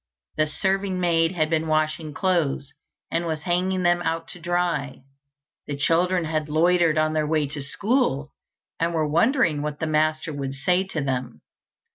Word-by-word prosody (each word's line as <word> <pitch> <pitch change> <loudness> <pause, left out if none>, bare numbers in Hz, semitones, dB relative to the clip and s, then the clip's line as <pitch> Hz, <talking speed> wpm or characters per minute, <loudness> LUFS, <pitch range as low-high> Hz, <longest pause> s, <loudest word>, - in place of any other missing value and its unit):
The 155 0 +2
serving 190 +3 -1
maid 165 -1 +2
had 155 -4 +1
been 160 0 0
washing 155 0 0
clothes, 150 -5 0 0.4
and 170 +1 -1
was 155 -2 -3
hanging 185 +2 0
them 175 0 +3
out 165 -1 -2
to 180 - -10
dry. 170 -6 -1 0.6
The 145 - -4
children 175 +4 +2
had 155 -1 -2
loitered 165 +1 +3
on 155 0 +2
their 155 -1 0
way 155 -1 +1
to 145 0 -5
school, 150 - 0 0.5
and 170 +1 0
were 155 -1 +1
wondering 170 - +2
what 150 0 -4
the - - -1
master 155 0 0
would 135 -1 -4
say 180 +7 +2
to 165 -5 -3
them. 130 - -3
160 Hz, 165 wpm, -24 LUFS, 150-175 Hz, 0.6 s, them